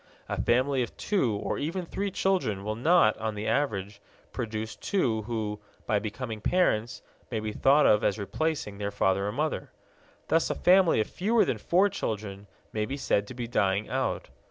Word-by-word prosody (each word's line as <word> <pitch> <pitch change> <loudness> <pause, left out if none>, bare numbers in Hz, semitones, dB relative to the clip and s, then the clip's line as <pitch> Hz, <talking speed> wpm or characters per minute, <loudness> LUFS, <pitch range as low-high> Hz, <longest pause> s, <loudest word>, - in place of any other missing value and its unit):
A - - -2
family 130 +2 +2
of 120 - -4
two 135 - +1
or 100 - -3
even 170 +5 -3
three 200 +4 -3
children 140 - 0
will 105 +1 -2
not, 150 -2 +4
on 110 -1 -2
the 105 +1 -4
average, 100 -7 -1 0.3
produce 110 -2 -4
two 120 - 0
who, 105 -2 -3 0.3
by 105 -3 +2
becoming 110 +1 -5
parents, 120 - +1 0.3
may 115 - -2
be 110 0 -3
thought 140 +7 +4
of 105 - +4
as 100 - +1
replacing 125 0 -2
their 100 0 -1
father 100 -1 +1
and 105 +5 -4
mother. 155 +1 -1 0.6
Thus 165 - +2
a - - -1
family 180 -6 +5
of - - -2
fewer 220 +5 +2
than - - -1
four 185 +4 +3
children 105 - -4 0.3
may 105 -1 0
be 140 - -4
said 100 -6 0
to 130 - -9
be 120 -1 -4
dying 100 -3 +1
out. 130 0 -2
115 Hz, 180 wpm, -28 LUFS, 105-155 Hz, 0.6 s, family